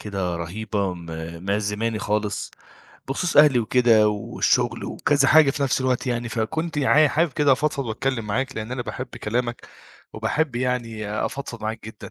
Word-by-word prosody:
كده 95 Hz, -4 st, -3 dB
رهيبة 100 Hz, +3 st, -3 dB
م 85 Hz, -1 st, -11 dB, 0.4 s
مأ 100 Hz, +1 st, +1 dB
زماني 105 Hz, +2 st, -2 dB
خالص 105 Hz, 0 st, -2 dB, 0.6 s
بخصوص 165 Hz, +5 st, -1 dB
أهلي 145 Hz, -3 st, +7 dB
وكده 115 Hz, -2 st, +4 dB
والشغل 105 Hz, -1 st, 0 dB
وكذا 140 Hz, -2 st, +1 dB
حاجة 155 Hz, -2 st, +6 dB
في 145 Hz, 0 st, -3 dB
نفس 135 Hz, -1 st, +1 dB
الوقت 130 Hz, 0 st, 0 dB
يعني، 120 Hz, -1 st, -1 dB
فكنت 155 Hz, +9 st, -2 dB
عا 150 Hz, +2 st, +5 dB
حابب 160 Hz, +2 st, +1 dB
كده 145 Hz, 0 st, +3 dB
أفضفض 140 Hz, +1 st, 0 dB
وأتكلم 115 Hz, +1 st, -2 dB
معاك 130 Hz, +6 st, -2 dB
لأن 110 Hz, +2 st, -4 dB
أنا 125 Hz, -1 st, -3 dB
باحب 130 Hz, +2 st, -5 dB
كلامك، 120 Hz, 0 st, -3 dB, 0.5 s
وباحب 150 Hz, -6 st, -1 dB
يعني 120 Hz, -4 st, -2 dB
آآ 105 Hz, +1 st, -2 dB
أفضفض 125 Hz, -5 st, -7 dB
معاك 110 Hz, +1 st, -4 dB
جدًا. 110 Hz, -, -10 dB
120 Hz, 165 wpm, -23 LUFS, 105-135 Hz, 0.6 s, أهلي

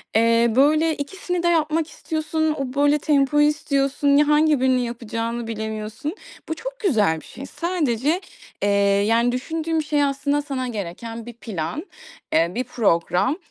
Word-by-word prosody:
eee, 230 Hz, +1 st, +4 dB
böyle, 305 Hz, +4 st, +4 dB
ikisini 355 Hz, +4 st, -3 dB
de -, -, +2 dB
yapmak 320 Hz, -1 st, +1 dB
istiyorsun, 315 Hz, 0 st, -2 dB
o, 260 Hz, -2 st, -3 dB
böyle, 290 Hz, +1 st, +3 dB
tempoyu 295 Hz, 0 st, +3 dB
istiyorsun, 285 Hz, -1 st, 0 dB
ya, 295 Hz, -, +4 dB
hangi 300 Hz, -1 st, +4 dB
birini 260 Hz, -1 st, +3 dB
yapacağını 230 Hz, 0 st, -4 dB
bilemiyorsun. 220 Hz, -, -4 dB, 0.3 s
Bu 320 Hz, -, 0 dB
çok -, -, -7 dB
güzel 210 Hz, -, +2 dB
bir -, -, -16 dB
şey. 270 Hz, +4 st, -9 dB
Sadece, 315 Hz, -, -1 dB, 0.4 s
eee, 205 Hz, -, +2 dB, 0.4 s
yani 235 Hz, +2 st, +3 dB
düşündüğüm 320 Hz, +5 st, -2 dB
şey 295 Hz, -1 st, +1 dB
aslında 285 Hz, +1 st, 0 dB
sana 270 Hz, -3 st, -3 dB
gereken 225 Hz, +2 st, -6 dB
bir 240 Hz, -, -8 dB
plan, 215 Hz, -, -5 dB, 0.5 s
eee, 165 Hz, +2 st, +3 dB
bir 250 Hz, -, 0 dB
program, 220 Hz, -, +1 dB
275 Hz, 145 wpm, -22 LUFS, 230-305 Hz, 0.5 s, eee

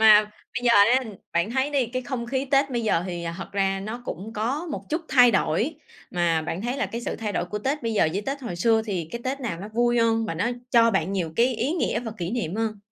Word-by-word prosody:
Mà 215 Hz, -1 st, +8 dB
bây 225 Hz, +4 st, -9 dB
giờ 235 Hz, -, +5 dB
ha, 240 Hz, +6 st, +6 dB, 0.3 s
bạn 170 Hz, +5 st, +1 dB
thấy 265 Hz, +4 st, 0 dB
đi, 270 Hz, -5 st, +1 dB
cái 255 Hz, +2 st, -3 dB
không 240 Hz, -1 st, -4 dB
khí 265 Hz, +2 st, -1 dB
Tết 275 Hz, 0 st, +3 dB
bây 240 Hz, -2 st, -1 dB
giờ 180 Hz, -6 st, +2 dB
hì 175 Hz, -2 st, -4 dB
thật -, -, -6 dB
ra 195 Hz, -1 st, +1 dB
nó 225 Hz, +4 st, -6 dB
cũng 215 Hz, +1 st, -6 dB
có 260 Hz, +11 st, -1 dB
một -, -, -4 dB
chút 320 Hz, +2 st, 0 dB
thay 245 Hz, -2 st, +7 dB
đổi, 220 Hz, -, +1 dB, 0.4 s
mà 170 Hz, -2 st, +1 dB
bạn 175 Hz, +4 st, -4 dB
thấy 245 Hz, +3 st, -2 dB
là -, -, 0 dB
cái 235 Hz, -, -5 dB
sự -, -, -3 dB
thay 215 Hz, -2 st, -3 dB
đổi -, -, 0 dB
của 210 Hz, +3 st, -4 dB
Tết 270 Hz, +6 st, -2 dB
bây 230 Hz, -1 st, -1 dB
giờ 160 Hz, -, +4 dB
với 200 Hz, +2 st, -2 dB
Tết 275 Hz, +1 st, -2 dB
hồi 180 Hz, -8 st, -4 dB
xưa 220 Hz, +4 st, +3 dB
thì 175 Hz, -6 st, -3 dB
cái 235 Hz, -, -4 dB
Tết 270 Hz, +2 st, -2 dB
nào 185 Hz, -9 st, -3 dB
nó 205 Hz, -, -6 dB
vui 240 Hz, +2 st, +2 dB
hơn, 225 Hz, -1 st, +3 dB
và 165 Hz, -, -3 dB
nó 185 Hz, +7 st, 0 dB, 0.2 s
cho 230 Hz, -1 st, +6 dB
bạn 190 Hz, -1 st, 0 dB
nhiều 170 Hz, -5 st, -2 dB
cái 245 Hz, +1 st, +3 dB
ý 260 Hz, +8 st, 0 dB
nghĩa 345 Hz, -, 0 dB
và 225 Hz, -3 st, -5 dB
kỷ 175 Hz, +1 st, -3 dB
niệm 210 Hz, -8 st, -2 dB
hơn? 220 Hz, -2 st, -1 dB
225 Hz, 270 wpm, -25 LUFS, 195-250 Hz, 0.4 s, Mà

